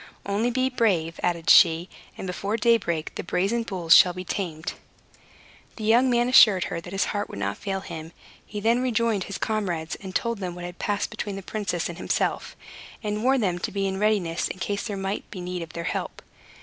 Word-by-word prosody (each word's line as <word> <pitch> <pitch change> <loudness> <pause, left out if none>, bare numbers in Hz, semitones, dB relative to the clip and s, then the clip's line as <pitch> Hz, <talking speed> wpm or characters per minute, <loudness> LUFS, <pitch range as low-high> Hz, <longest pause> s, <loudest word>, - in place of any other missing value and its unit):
"Only 205 +4 0
be 255 +2 +1
brave," 190 -10 0
added 170 -2 -1
she, 170 0 +6 0.3
"and - - -6
before 200 +4 -2
daybreak 210 -8 +1
the - - -5
brazen 195 +7 0
bulls 185 -7 +3
shall 180 - +7
be 180 +1 -6
tamed." 165 -5 -3 1.0
The 220 - -7
young 235 +4 +4
man 240 0 +2
assured 210 -7 +7
her 170 - -4
that 175 - -10
his 195 0 +1
heart 205 0 -2
would - - -8
not 100 0 -3
fail 195 -1 -3
him. 165 -3 -8 0.3
He 210 - -6
then 230 +4 +2
rejoined 230 -5 +1
his 200 - -5
comrades, 180 -7 -2
and 190 -1 -8
told 235 -2 0
them 180 -3 -4
what 175 0 -7
had 175 0 -9
passed 205 -1 -1
between 205 -2 -4
the 195 - -7
princess 185 -4 -2
and 170 0 -8
himself, - - -1 0.5
and 210 0 -2
warned 260 -1 +3
them 180 -3 0
to - - -3
be 200 -1 -1
in 190 0 -2
readiness 200 -6 +1
in - - -6
case 200 +4 -3
there 205 -3 -4
might 195 +1 -4
be 190 - -8
need 180 0 -4
of 165 - -8
their 170 - -4
help. 165 - -4
195 Hz, 210 wpm, -25 LUFS, 175-215 Hz, 1.0 s, shall